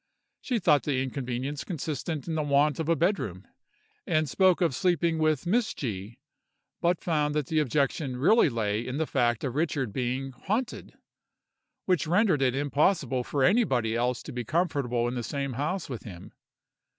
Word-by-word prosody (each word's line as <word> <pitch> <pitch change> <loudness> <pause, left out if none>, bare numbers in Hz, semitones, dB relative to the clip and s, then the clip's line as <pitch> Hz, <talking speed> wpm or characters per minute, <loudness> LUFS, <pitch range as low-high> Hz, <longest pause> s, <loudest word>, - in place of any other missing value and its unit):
She 250 - -1
thought 150 -8 +4
the 140 -3 -1
inconvenience 130 +2 -4
consisted 155 -2 -4
in 165 - -2
the 160 - 0
want 145 0 +2
of 160 0 -2
a 165 - +4
bed 180 +5 +2
room, 90 +2 -6 0.6
and 155 0 +2
spoke 185 +5 +3
of 170 -6 +2
sleeping 170 +2 +1
with 155 -1 +1
Miss 220 +6 +1
G——, 110 -3 -5 0.6
but 175 0 +1
found 150 -3 0
that 150 -2 0
the 155 +3 0
objection 140 -1 0
really 170 - +5
lay 110 -3 -1
in 130 +3 -4
the 160 - 0
fact 120 -5 0
of 130 - -2
Richard 145 -7 -1
being 130 +2 -2
'haunted,' 220 - -4 0.9
which 180 -5 +1
rendered 180 -3 +3
it 130 -1 +2
impossible 140 -2 +1
for 140 +2 -1
anybody 130 - +2
else 120 0 0
to - - -8
be 125 0 -3
comfortable 140 -6 0
in 120 - -2
the 125 - -2
same 140 +2 -3
house 155 +9 -2
with 125 -5 -6
him. 90 -5 -11
145 Hz, 175 wpm, -28 LUFS, 125-165 Hz, 0.9 s, really